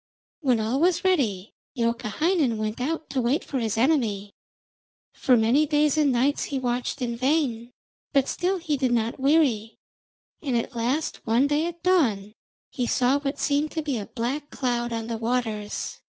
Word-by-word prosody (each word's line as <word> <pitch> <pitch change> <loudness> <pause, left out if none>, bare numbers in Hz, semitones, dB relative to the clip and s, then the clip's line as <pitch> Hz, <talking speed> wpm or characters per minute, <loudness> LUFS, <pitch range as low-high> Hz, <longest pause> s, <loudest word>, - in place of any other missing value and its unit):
When 255 -7 +2
all 225 +5 0
was 350 +3 +2
ready 230 - 0 0.2
Youkahainen 240 - 0
went 215 +2 -3
out 315 +4 -2
to 260 - 0
wait 245 +5 +1
for 270 - -3
his 225 -2 -1
enemy. 225 -7 +1 0.8
For 255 -2 +3
many 245 +7 +3
days 300 0 +2
and 300 -3 +3
nights 260 +4 +1
he 275 - -3
watched 250 +1 -2
in 235 -1 -2
vain, 255 -3 0 0.4
but 275 -2 +2
still 370 +2 0
he 320 -4 -2
did 260 -2 0
not 230 +1 0
weary, 265 -6 +2 0.6
and 265 -6 0
at 235 +2 -3
last 250 +7 -1
one 235 +5 +3
day 295 +3 +1
at 345 0 -8
dawn 230 - +2 0.4
he 245 -2 -2
saw 255 +4 +2
what 280 0 -3
seemed 290 +1 +1
to 315 - -2
be 280 -6 -2
a 205 - -6
black 260 +5 -3
cloud 240 -2 -2
on 225 -1 -3
the 230 -1 -4
waters. 225 -3 -2
255 Hz, 170 wpm, -25 LUFS, 230-295 Hz, 0.8 s, For